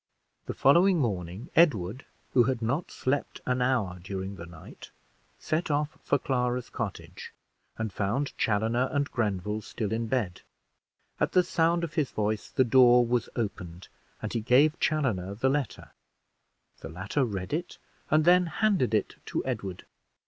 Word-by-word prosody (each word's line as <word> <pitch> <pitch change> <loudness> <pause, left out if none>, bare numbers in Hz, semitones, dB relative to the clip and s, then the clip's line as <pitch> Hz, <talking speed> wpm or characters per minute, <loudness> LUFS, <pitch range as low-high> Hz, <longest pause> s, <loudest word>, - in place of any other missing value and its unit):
The - - -4
following 175 +7 +5
morning, 100 - -3
Edward, 130 - +3 0.3
who 120 -2 +5
had 130 -1 0
not 140 +9 -1
slept 140 +2 -2
an 125 0 0
hour 115 -8 0
during 95 +2 -5
the 85 -2 -9
night, 85 -2 -12 0.5
set 155 +2 -2
off 150 +1 0
for - - +1
Clara's 125 -2 -1
cottage, - - -6 0.5
and 110 -3 -3
found 115 +10 -1
Chaloner 115 +4 +1
and 145 0 -1
Grenville 105 -2 -1
still 110 0 -4
in 115 0 -1
bed. 110 -8 -1 0.8
At - - 0
the 180 - +5
sound 170 0 +1
of 165 -2 -4
his 150 -5 0
voice 105 0 -2
the 130 - +2
door 125 0 +6
was 120 -1 0
opened, 90 -6 -5 0.3
and 110 - -3
he 115 - -1
gave 140 +8 +4
Chaloner 105 - 0
the 130 +5 +1
letter; 135 -9 -3 0.9
the - - -8
latter 95 - -1
read 95 -4 -4
it 175 +3 -3 0.3
and 155 0 +3
then 180 0 +5
handed 175 - +1
it 105 - -1
to - - -2
Edward. 100 -8 -4
120 Hz, 155 wpm, -28 LUFS, 100-145 Hz, 0.9 s, door